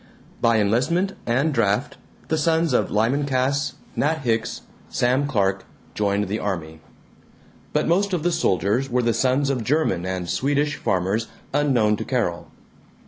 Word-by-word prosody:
By 115 -1 +4
enlistment 135 - +1
and 140 +6 +1
draft, 100 -5 +1 0.3
the 160 - +1
sons 160 -1 +2
of - - +2
Lyman 125 +7 +1
Cass, 135 +1 0 0.2
Nat 155 +1 0
Hicks, 115 -2 -1 0.3
Sam 130 +4 +1
Clark 95 -6 0 0.3
joined 100 -1 0
the 105 +3 -2
army. 80 -5 -4 0.9
But - - 0
most 195 +4 +2
of 175 -4 -1
the 175 - +2
soldiers 105 - +1
were 125 0 +1
the 115 0 +2
sons 130 +4 +1
of 125 -4 -2
German 130 - +1
and 95 -1 -3
Swedish 145 +8 0
farmers 95 +5 0 0.3
unknown 125 -8 +2
to - - -4
Carol. - - -2
125 Hz, 145 wpm, -23 LUFS, 105-145 Hz, 0.9 s, By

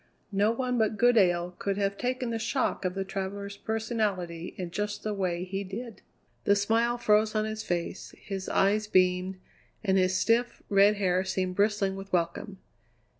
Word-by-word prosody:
No 200 +2 +3
one 250 +1 -1
but 220 -1 +1
Goodale 185 -7 +4
could 200 -1 -1
have 200 -1 0
taken 250 +1 -2
the 225 - -2
shock 255 -3 -1
of 180 0 -1
the 195 - -1
traveller's 200 +1 -4
personality 210 -7 -2
in 180 -2 -5
just 205 +2 -3
the 215 - -1
way 180 -3 -1
he 195 +2 -3
did. 210 +2 -7 0.4
The 200 - +5
smile 230 +4 +2
froze 215 -1 +3
on 215 0 +1
his 215 0 -4
face, 175 -3 -4
his 195 -2 -5
eyes 210 +2 +2
beamed, 185 -1 +2 0.5
and 190 -2 +3
his 185 0 +2
stiff, 235 +1 +1
red 200 +1 +5
hair 185 -2 +1
seemed 185 -1 -1
bristling 205 -1 +1
with 195 0 -9
welcome. 175 +3 -1
200 Hz, 170 wpm, -28 LUFS, 185-220 Hz, 0.5 s, The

